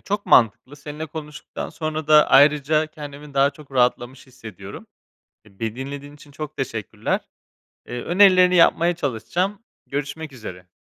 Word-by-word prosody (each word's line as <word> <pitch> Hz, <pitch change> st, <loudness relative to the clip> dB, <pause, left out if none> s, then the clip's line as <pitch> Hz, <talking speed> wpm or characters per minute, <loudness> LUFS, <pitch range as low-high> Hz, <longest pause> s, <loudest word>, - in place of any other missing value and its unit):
çok 205 Hz, +1 st, -4 dB
mantıklı. 125 Hz, +4 st, +3 dB
Seninle 150 Hz, +2 st, -7 dB
konuştuktan 155 Hz, -1 st, -8 dB
sonra 155 Hz, -1 st, -4 dB
da 150 Hz, -1 st, +7 dB
ayrıca 150 Hz, +2 st, +4 dB
kendimi 145 Hz, -2 st, -11 dB
daha 140 Hz, +1 st, +4 dB
çok 140 Hz, -1 st, -17 dB
rahatlamış 125 Hz, 0 st, 0 dB
hissediyorum. 110 Hz, -7 st, -11 dB, 0.6 s
E, 100 Hz, -1 st, -22 dB
beni 115 Hz, 0 st, -3 dB
dinlediğin 140 Hz, +2 st, -7 dB
için 145 Hz, 0 st, -17 dB
çok 150 Hz, +1 st, -8 dB
teşekkürler. 115 Hz, -6 st, -3 dB, 0.7 s
Eee, 120 Hz, 0 st, -5 dB
önerilerini 185 Hz, -1 st, +5 dB
yapmaya 170 Hz, 0 st, +4 dB
çalışacağım. 170 Hz, -, -2 dB, 0.3 s
Görüşmek 145 Hz, +1 st, -5 dB
üzere. 90 Hz, -7 st, -10 dB
145 Hz, 135 wpm, -22 LUFS, 130-155 Hz, 0.7 s, da